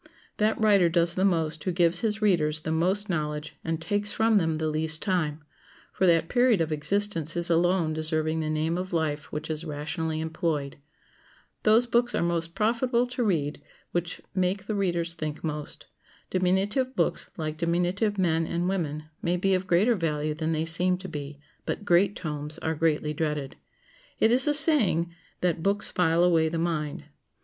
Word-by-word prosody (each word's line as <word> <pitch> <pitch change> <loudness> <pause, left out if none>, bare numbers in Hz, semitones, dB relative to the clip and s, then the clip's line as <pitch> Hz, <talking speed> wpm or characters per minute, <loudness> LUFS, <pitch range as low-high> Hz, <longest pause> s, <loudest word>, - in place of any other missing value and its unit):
That 215 +1 +1
writer 200 -5 +4
does 170 0 +2
the 185 - -1
most 160 -5 0
who 185 - -1
gives 170 0 +2
his 215 -1 -1
readers 155 -6 +2
the 160 - -3
most 185 +6 +1
knowledge 150 -3 -3
and 165 -1 -2
takes 205 +4 -1
from 225 -1 +3
them 165 -4 +1
the 155 0 -2
least 155 +1 0
time, 160 -6 -1 0.5
for 190 - +2
that 165 -1 +3
period 245 -3 +3
of 160 -1 -1
existence 165 0 0
is 170 0 +3
alone 170 -1 +2
deserving 155 0 0
the 155 -1 -2
name 160 +3 -1
of 185 0 -5
life 155 -3 -2
which 150 +1 -4
is 155 0 -3
rationally 155 +1 -3
employed. 160 -3 -2 0.8
Those 220 +3 +4
books 240 0 +1
are - - +1
most 170 -1 -2
profitable 235 +3 +1
to 245 0 -3
read 155 -8 -1 0.3
which 175 0 -3
make 185 +1 -1
the 215 - -3
readers 175 -4 -1
think 155 -3 -5
most. 150 -2 -5 0.5
Diminutive 195 +8 0
books, - - +1
like 155 -2 -4
diminutive 180 +5 0
men 165 -3 +1
and 170 +1 -1
women, 155 -6 -2 0.2
may 175 +1 0
be 195 +2 +1
of 185 0 0
greater 195 +8 +3
value 155 -5 -1
than 160 +1 -2
they 160 0 0
seem 180 +3 +2
to 190 +1 -8
be; 145 -3 -7 0.2
but 205 - -4
great 190 +2 +3
tomes 150 -2 -4
are 160 - 0
greatly 155 -1 0
dreaded. 150 -3 -3 0.6
It 220 - +4
is 255 +4 +4
a 295 - +3
saying 225 - +2 0.3
that 175 -2 0
"books 200 +3 +3
file 170 -1 +2
away 165 -3 +3
the 165 - -3
mind." 160 -3 -2
170 Hz, 175 wpm, -26 LUFS, 155-195 Hz, 0.8 s, writer